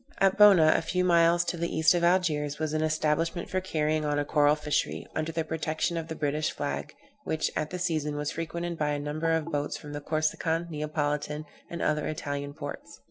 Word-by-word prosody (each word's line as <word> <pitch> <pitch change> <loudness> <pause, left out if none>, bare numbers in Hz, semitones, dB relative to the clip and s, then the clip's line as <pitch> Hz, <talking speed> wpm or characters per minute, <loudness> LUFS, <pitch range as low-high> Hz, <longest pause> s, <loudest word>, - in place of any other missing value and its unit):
At 195 -1 +4
Bona, 190 -7 +7
a - - +2
few 180 +3 0
miles 170 0 +4
to 175 - -2
the 170 +1 -1
east 160 +2 +5
of 175 -1 0
Algiers, 155 -5 +2
was 155 -1 -2
an 155 - 0
establishment 155 +2 0
for 185 - 0
carrying 155 -3 0
on 145 -1 0
a 145 - 0
coral 145 0 +4
fishery, 150 -1 -1
under 155 +1 -1
the 165 0 -1
protection 160 +1 -2
of 165 -1 -3
the 160 - -5
British 150 0 0
flag, - - -4 0.3
which, 160 - -1
at 155 0 -1
the 180 - -4
season, 155 -4 -1
was 150 0 -2
frequented 170 +1 -4
by 150 -1 +1
a - - -1
great 145 - -5
number 155 +2 -1
of 160 0 0
boats 145 -1 -2
from 150 0 -9
the 145 - -5
Corsican, 160 +2 0
Neapolitan, 150 0 -2 0.2
and 170 - -4
other 150 -1 +1
Italian 145 -2 -4
ports. 145 -2 -8
155 Hz, 210 wpm, -28 LUFS, 150-165 Hz, 0.3 s, Bona